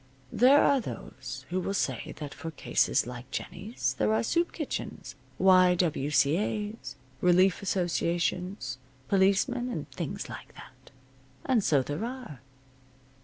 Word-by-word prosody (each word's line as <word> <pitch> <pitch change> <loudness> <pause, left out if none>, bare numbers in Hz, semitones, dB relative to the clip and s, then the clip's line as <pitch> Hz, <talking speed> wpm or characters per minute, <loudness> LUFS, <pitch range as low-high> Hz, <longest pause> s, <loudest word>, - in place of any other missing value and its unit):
There 265 +5 +6
are 280 -1 +4
those 130 - -7
who 185 - 0
will 195 +2 -2
say - - -2
that 150 -3 -6
for 165 - -6
cases 160 - +1
like 125 +1 -8
Jennie's 165 - -3
there 105 0 +3
are 115 - +1
soup 340 - +1
kitchens, 305 -4 -5 0.2
Y. 185 -1 +6
W. 160 -5 0
C. 145 +3 +3
A.'s, 210 - -4 0.3
relief 180 +2 +4
associations, 175 -5 -1 0.3
policemen, 200 +6 +2
and - - -4
things - - -5
like - - -10
that. - - -14 0.6
And 250 -6 +2
so 140 -7 +3
there 145 - -4
are. 240 - -6
180 Hz, 135 wpm, -29 LUFS, 140-210 Hz, 0.6 s, There